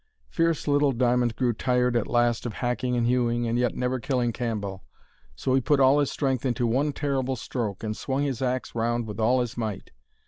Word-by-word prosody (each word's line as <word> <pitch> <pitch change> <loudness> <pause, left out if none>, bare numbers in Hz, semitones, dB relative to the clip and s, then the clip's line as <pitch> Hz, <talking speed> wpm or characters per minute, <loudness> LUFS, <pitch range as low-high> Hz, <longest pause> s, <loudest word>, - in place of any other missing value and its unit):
Fierce 165 -2 0
little 145 -1 +3
Diamond 120 -1 +1
grew 125 -2 +1
tired 125 +2 +1
at 115 - +1
last 120 0 +1
of 115 - -5
hacking 125 +3 -1
and 120 -1 +1
hewing 120 -1 +1
and 115 +1 0
yet 125 -1 +1
never 125 +1 -1
killing 125 -1 0
Cambell. 105 -6 -4 0.5
So 130 - -1
he 135 - +3
put 145 +3 +2
all 135 +2 +5
his 145 - +1
strength 135 -4 -1
into 120 -2 0
one 135 +6 +1
terrible 135 -2 -1
stroke, 110 -4 -4
and 110 -1 -2
swung 135 +4 -2
his 135 -4 -2
axe 130 0 -2
round 120 0 0
with 105 0 -7
all 125 +3 +3
his 120 0 -4
might. 110 -4 -4
125 Hz, 205 wpm, -26 LUFS, 115-130 Hz, 0.5 s, all